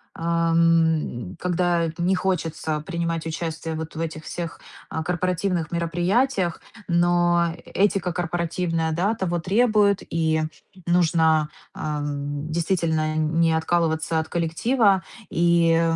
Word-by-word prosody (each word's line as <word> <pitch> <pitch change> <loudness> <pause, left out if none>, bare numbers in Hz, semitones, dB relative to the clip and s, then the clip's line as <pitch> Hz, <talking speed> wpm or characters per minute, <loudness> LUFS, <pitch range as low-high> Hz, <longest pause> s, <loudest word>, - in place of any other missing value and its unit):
ам, 165 - +1
когда 175 -1 +1
не 180 +2 +2
хочется 165 -4 -1
принимать 170 -1 -3
участие 160 0 -4
вот 160 0 -6
в - - -5
этих 160 -1 -4
всех, 170 -1 -5 0.3
а, 160 - -3
корпоративных 180 -1 -1
мероприятиях, 175 +4 0 0.3
но 175 -1 +2
этика 195 -3 +1
корпоративная, 165 -1 -1
да, 180 +7 +1
того 175 -3 -1
требует, 205 +1 +3
и 160 -1 +1 0.4
нужно, 160 -3 +3 0.2
а, 150 -1 -3
действительно, 155 +3 -1
не 160 +1 +2
откалываться 160 0 +1
от 160 0 -4
коллектива, 190 +4 +2 0.3
и, 170 -1 +3
170 Hz, 105 wpm, -24 LUFS, 160-175 Hz, 0.4 s, требует